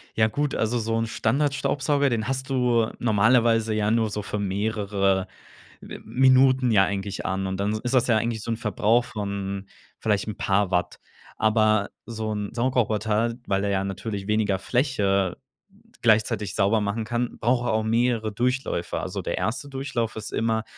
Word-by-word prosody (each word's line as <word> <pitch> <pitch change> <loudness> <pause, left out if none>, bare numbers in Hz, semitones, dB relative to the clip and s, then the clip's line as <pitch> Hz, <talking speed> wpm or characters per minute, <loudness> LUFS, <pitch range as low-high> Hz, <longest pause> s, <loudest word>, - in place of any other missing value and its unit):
Ja 110 0 +4
gut, 145 +5 -2
also 115 +2 0
so 115 0 -1
'n 115 0 -1
Standardstaubsauger, 140 +3 +1
den 115 -2 -1
hast 130 0 -2
du 125 -4 +2
normalerweise 115 0 +3
ja 105 0 +1
nur 115 -1 +2
so 105 +1 -3
für 105 0 -4
mehrere 100 -1 0 0.5
M - - -9
Minuten 130 -1 +4
ja 100 -3 +5
eigentlich 100 0 -4
an 95 0 -1
und 95 0 -3
dann 105 +2 0
ist 125 +1 -2
das 130 -1 +3
ja 115 -3 +4
eigentlich 115 0 -2
so 115 - -7
'n 115 - -1
Verbrauch 110 +2 +1
von 100 -3 -4 0.3
vielleicht 105 -2 0
'n 105 - -4
paar 100 -1 +1
Watt. 90 -1 -1 0.4
Aber 110 -2 +2 0.2
so 110 -2 -4
'n 105 -1 -3
Saugroboter 115 -2 0
weil 95 0 0
er 100 - 0
ja 95 -1 0
natürlich 100 +1 -5
weniger 105 -2 +1
Fläche 100 - 0 0.6
gleichzeitig 110 -3 +2
sauber 105 +1 +2
machen 105 +2 -2
kann, 120 +1 -2
braucht 120 +1 +1
er 110 - +1
auch 110 - +1
mehrere 115 -1 +1
Durchläufe. 120 -6 -1
Also - - -4
der - - -3
1. 125 +5 -2
Durchlauf 135 -5 -3
ist 110 - -6
immer, 110 -1 0
110 Hz, 170 wpm, -25 LUFS, 100-120 Hz, 0.6 s, ja